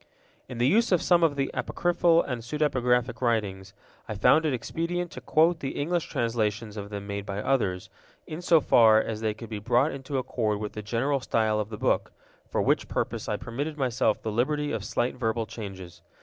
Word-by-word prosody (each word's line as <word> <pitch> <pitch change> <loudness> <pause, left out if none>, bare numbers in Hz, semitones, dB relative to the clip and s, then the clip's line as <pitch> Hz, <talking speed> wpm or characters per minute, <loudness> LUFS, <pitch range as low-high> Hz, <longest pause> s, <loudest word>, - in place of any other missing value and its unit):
In 125 - -7
the 120 - +2
use 225 - +3
of 180 - +4
some 175 +1 +3
of 160 -4 +3
the 135 -1 -1
apocryphal 175 -1 +2
and 125 -3 -4
pseudepigraphic 125 -2 0
writings, 100 -5 -1 0.3
I - - -3
found 160 0 +4
it - - +1
expedient 170 +7 -3
to - - -9
quote 165 +2 +3
the 135 - -4
English 170 +3 -1
translations 110 -2 -1
of 100 -1 -6
them 100 -1 -6
made 100 0 -4
by 100 0 -5
others, 105 -7 0 0.4
in 155 +2 -6
so 170 -3 +4
far 110 -4 +6
as 110 -1 -3
they 110 -1 -1
could 115 +1 -10
be 105 - -3
brought 120 +7 +2
into 135 0 -4
accord 110 -4 -1
with 105 -1 -5
the 105 - -5
general 120 +7 0
style 110 -3 +1
of 105 0 -3
the 105 - -6
book, - - 0 0.4
for - - 0
which - - +1
purpose - - -3
I - - 0
permitted 145 +6 -5
myself 125 -5 0
the 110 - -2
liberty 145 +6 0
of 110 -3 -3
slight 120 +3 -1
verbal 115 -2 -1
changes. 95 -6 -9
120 Hz, 200 wpm, -27 LUFS, 110-150 Hz, 0.4 s, far